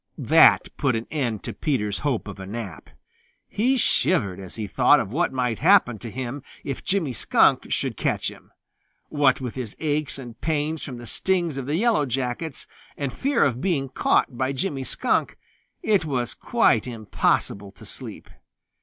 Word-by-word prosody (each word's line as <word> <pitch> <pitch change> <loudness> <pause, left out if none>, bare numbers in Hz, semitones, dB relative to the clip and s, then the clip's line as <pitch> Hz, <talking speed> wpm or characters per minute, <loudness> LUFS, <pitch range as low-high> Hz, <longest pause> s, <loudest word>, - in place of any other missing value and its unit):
That - - +6
put 130 -4 +1
an 115 +1 -3
end 125 -9 -2
to - - -5
Peter's 105 -9 -1
hope 135 -7 -1
of 100 -2 -8
a 95 - -7
nap. 105 -4 -7 0.6
He 255 +6 +1
shivered 100 - +2
as 95 -2 -9
he 110 - -4
thought 100 - +4
of 95 - -3
what 170 +7 +1
might 125 -4 -1
happen 160 - +4
to 115 - -7
him 130 +4 -5 0.2
if 135 - -5
Jimmy 175 -9 0
Skunk - - +3
should - - -1
catch - - -1
him. - - -16 0.6
What 145 -3 +3
with 125 -3 -4
his 125 -5 -6
aches 150 -2 -1
and 120 -4 -10
pains 155 0 -1
from 130 -3 -6
the 120 - -9
stings 175 +3 0
of 135 -1 -4
the 150 - 0
Yellow 210 - +2
Jackets, 130 +4 -3 0.3
and 140 -3 -3
fear 280 +1 +1
of 130 -2 0
being 145 -7 0
caught 130 0 +1
by 130 +2 -1
Jimmy 135 -2 -2
Skunk, - - 0 0.5
it 205 -5 +3
was 130 -6 -2
quite 110 +2 +2
impossible 105 -3 -1
to - - -15
sleep. - - -6
130 Hz, 170 wpm, -24 LUFS, 115-155 Hz, 0.6 s, That